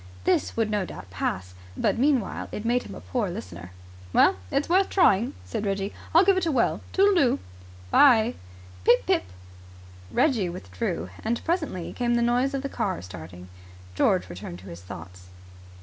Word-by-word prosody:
This - - +1
would 220 -2 +1
no 205 -2 +1
doubt 95 - -9
pass, 90 +1 -3 0.2
but - - +1
meanwhile 265 -6 +1
it 210 - -5
made 245 +2 +2
him - - -9
a - - -9
poor 230 -6 -2
listener. 175 - -8 0.4
"Well, - - +5
it's 290 - 0
worth 375 +3 +3
trying," 230 - +3
said 90 - -4
Reggie. 195 0 -2 0.2
"I'll 340 +4 +6
give 390 -1 +4
it 370 - +1
a - - +2
whirl. 250 -5 +1
Toodleoo!" 380 -10 +4
"Good - - -18 0.5
bye." 240 -5 +6 0.5
"Pip 100 - +4
pip!" 95 - +2 0.8
Reggie 210 - +2
withdrew, 90 - -4
and 230 +2 -2
presently 315 - -2
came 240 -1 0
the 235 - +2
noise 250 +4 +1
of 270 - -3
the - - -1
car 180 - -2
starting. 90 0 -10 0.5
George 90 0 +2
returned 90 -1 -8
to 95 - -11
his 85 +1 -9
thoughts. 90 +1 -10
215 Hz, 170 wpm, -26 LUFS, -, 0.8 s, I'll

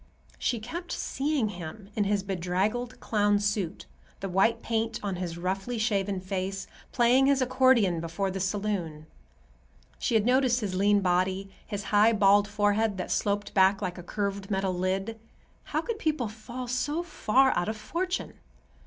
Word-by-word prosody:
She 240 - 0
kept 340 +11 -6
seeing 275 -5 -1
him 190 +3 -8
in 210 - +1
his 200 -1 +1
bedraggled 195 +6 -2
clown 205 -1 +2
suit, 205 -4 -2 0.3
the 195 - -4
white 220 +5 +2
paint 225 -1 -1
on 195 -3 -2
his 175 -2 -4
roughly 195 +7 -2
shaven 200 -3 0
face, 190 +1 -3 0.3
playing 250 +2 +4
his 280 -1 +4
accordion 255 -8 +3
before 170 +4 -2
the 195 - -4
saloon. 185 -5 -2 0.9
She 235 - 0
had 220 -1 +3
noticed 250 -1 +3
his 200 -3 -2
lean 200 +2 +3
body, 185 +1 0 0.2
his 205 -1 -4
high, 215 +2 +6
bald 205 0 +5
forehead 205 0 +1
that 180 - -4
sloped 205 0 -1
back 190 0 +4
like 185 -2 -4
a - - -6
curved 200 +1 -3
metal 190 -2 0
lid. 190 +5 -2 0.5
How - - -1
could 465 -3 -4
people 300 -7 0
fall 240 +4 -7
so 290 +7 -1
far 265 -5 +2
out 175 +4 0
of 220 - -3
fortune? 360 - -3
205 Hz, 160 wpm, -28 LUFS, 190-235 Hz, 0.9 s, high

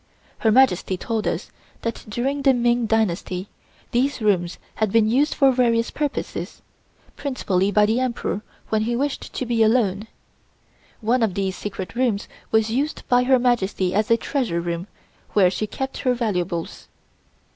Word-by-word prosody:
Her 220 - +3
Majesty 215 -6 +3
told 220 +3 -2
us - - -3 0.3
that 230 0 -4
during 270 +6 -1
the 270 -2 +4
Ming 240 -1 +2
dynasty 195 -3 -1 0.4
these 260 +4 +1
rooms 185 -5 +1 0.2
had 215 -3 +1
been 225 0 +4
used 270 +7 +2
for 275 -2 +5
various 235 -2 +2
purposes, 295 -2 -4 0.5
principally 200 -9 0
by 210 +1 +5
the 220 +3 +1
Emperor 240 -5 -2 0.3
when 220 -1 +1
he 235 +2 0
wished 280 +3 -2
to 255 - -3
be 235 -1 0
alone. 220 -2 +2 0.9
One 235 +3 +2
of 210 -5 +1
these 190 -1 -1
secret 190 -2 -6
rooms 235 -4 0 0.2
was 220 0 +2
used 280 +6 -2
by 250 0 +4
Her 260 0 +5
Majesty 205 -7 +1
as 210 +1 +1
a 230 - +5
treasure 230 -9 -1
room 170 +2 -3 0.5
where 185 -3 +5
she 215 - -2
kept 265 +5 -5
her 250 -2 +1
valuables. 180 -7 -2
225 Hz, 155 wpm, -23 LUFS, 200-250 Hz, 0.9 s, for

